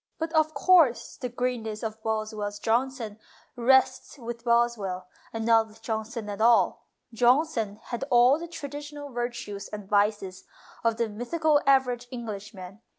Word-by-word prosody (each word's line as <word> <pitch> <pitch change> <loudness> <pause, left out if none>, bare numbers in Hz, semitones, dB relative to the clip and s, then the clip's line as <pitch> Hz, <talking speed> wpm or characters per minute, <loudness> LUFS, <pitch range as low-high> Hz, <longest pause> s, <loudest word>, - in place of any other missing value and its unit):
But, 325 +1 -4
of 310 -1 +2
course, 315 -5 +4
the 250 - -5
great 250 0 -2
ness 220 0 -6
of 220 0 -5
Boswell's 215 -2 -3
Johnson 230 -1 -1 0.4
rests 260 +3 +2
with 235 -2 -7
Boswell, 235 -6 +1 0.3
and 225 -1 -4
not 225 -1 +4
with 220 +1 -19
Johnson 220 -1 -4
at 205 0 -5
all. 230 0 +3 0.3
Johnson 240 -3 +2
had 240 +1 -5
all 250 +4 +5
the 340 - -6
traditional 290 -2 -8
virtues 235 -4 -4
and 210 -2 -8
vices 205 -2 0 0.4
of 230 -1 +1
the 235 -1 0
mythical 290 +8 +1
average 250 -3 +3
Englishman. 210 -4 -8
235 Hz, 145 wpm, -27 LUFS, 215-260 Hz, 0.4 s, all